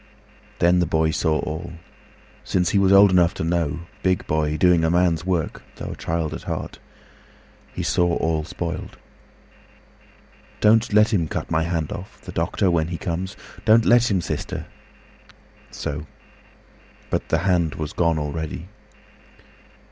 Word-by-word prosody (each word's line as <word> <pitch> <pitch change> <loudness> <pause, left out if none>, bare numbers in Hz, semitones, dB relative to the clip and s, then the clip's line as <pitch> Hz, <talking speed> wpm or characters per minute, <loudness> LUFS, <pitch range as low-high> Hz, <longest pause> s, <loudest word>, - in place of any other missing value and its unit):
Then 85 +1 +4
the 90 - +1
boy 80 0 +1
saw 80 -1 +1
all—Since 85 +2 -5
he 100 - +3
was 95 -1 +3
old 100 0 +7
enough 90 -2 +3
to - - -3
know, 85 -2 -1 0.2
big 95 -1 +1
boyDoing 80 +3 +2
a 80 - +2
man's 85 0 +1
work, 90 -4 -1
though - - -6
a - - -6
child 80 -1 -2
at - - -6
heart—He - - -9
saw 85 -1 +2
all 80 -1 0
spoiled. 85 +1 -5 1.6
"Don't 110 +2 +4
let 105 +2 +4
him 85 -6 +1
cut - - -5
my 80 - +2
hand 80 -2 -2
off—The 95 - -8
doctor, 95 - 0
when 80 -2 +1
he 85 0 -4
comes. 90 +3 -4 0.3
Don't 110 +1 +5
let 120 0 +5
him, 95 -4 +1
sister!"So. 75 -2 -8 1.0
But - - -1
the 80 - +3
hand 85 -5 +2
was 75 -1 -5
gone 85 -2 +1
already. 75 +3 -4
85 Hz, 135 wpm, -23 LUFS, 80-95 Hz, 1.6 s, old